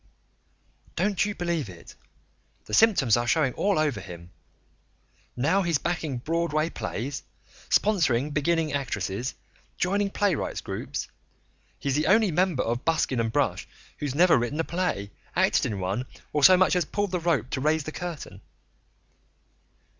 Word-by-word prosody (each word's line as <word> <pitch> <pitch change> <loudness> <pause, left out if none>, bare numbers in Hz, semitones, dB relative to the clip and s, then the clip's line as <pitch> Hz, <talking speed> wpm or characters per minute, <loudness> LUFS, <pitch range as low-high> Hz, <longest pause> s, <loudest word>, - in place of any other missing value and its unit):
"Don't 195 +2 +1
you 210 -1 -3
believe 170 - -2
it. 85 -2 -12 0.7
The 105 - -10
symptoms 165 - +5
are 120 0 -1
showing 135 -1 +2
all 200 -3 +1
over 150 -8 +1
him. 90 -2 -10 1.1
Now 155 +10 +2
he's 170 -4 +1
backing 160 -4 -2
Broadway 160 +3 -1
plays, 130 +5 -4 0.5
sponsoring 150 - +2
beginning 160 +1 +1
actresses, 120 -3 -2 0.4
joining 200 +3 +1
playwrights' 195 -4 -1
groups - - -5 0.7
he's 140 - -2
the 150 +3 +1
only 210 +1 +4
member 175 -4 +1
of 120 +3 -2
Buskin 160 -6 +1
and 115 -1 0
Brush - - 0 0.3
who's 140 -2 -3
never 170 -4 +5
written 120 +6 -2
a - - +2
play, 165 - -2 0.2
acted - - +3
in 100 -3 -3
one, 100 +7 -2 0.3
or 150 -1 +1
so 185 +5 +9
much 185 0 +3
as 180 - +2
pulled 205 +5 -2
the 180 - 0
rope 155 -8 0
to 130 - -2
raise 155 +2 +2
the 155 - -6
curtain." 155 - -7
155 Hz, 145 wpm, -26 LUFS, 125-175 Hz, 1.1 s, so